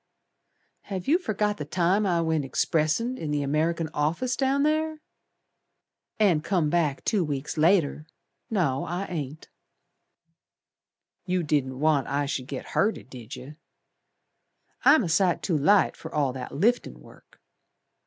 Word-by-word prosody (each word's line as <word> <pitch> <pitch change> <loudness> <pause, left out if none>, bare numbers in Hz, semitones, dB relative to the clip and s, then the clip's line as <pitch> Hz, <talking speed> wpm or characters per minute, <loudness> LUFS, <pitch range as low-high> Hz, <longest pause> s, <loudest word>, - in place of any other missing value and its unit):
"Have 190 -3 -5
yer 325 +6 +4
forgot 210 - -1
the 150 - -4
time 185 +6 +1
I 170 -2 +2
went 160 -2 0
expressin' 160 - 0
In 155 - -4
the 145 -1 0
American 160 +3 0
office, 170 +13 0
down 275 +1 +1
ther?" 310 +1 0 1.2
"And 180 -8 +3
come 170 -5 +1
back 155 -5 0
two 205 -4 +2
weeks 145 -2 -4
later! 155 -2 +2 0.4
No, 155 -11 0
I 180 +3 -3
ain't." 155 -4 -6 1.8
"You 180 -1 0
didn't 135 -4 -1
want 150 -2 +2
I 145 +1 0
should 130 -2 -4
git 135 -1 -6
hurted, 205 - -1
Did 125 +1 -9
yer? 145 +4 -11 1.3
I'm 275 0 +6
a - - -2
sight 175 +2 +2
too 175 - 0
light 195 +8 +3
fer 160 - -9
all 140 -4 0
that 130 -1 -7
liftin' 235 +11 0
work. - - -19
165 Hz, 140 wpm, -26 LUFS, 145-200 Hz, 1.8 s, I'm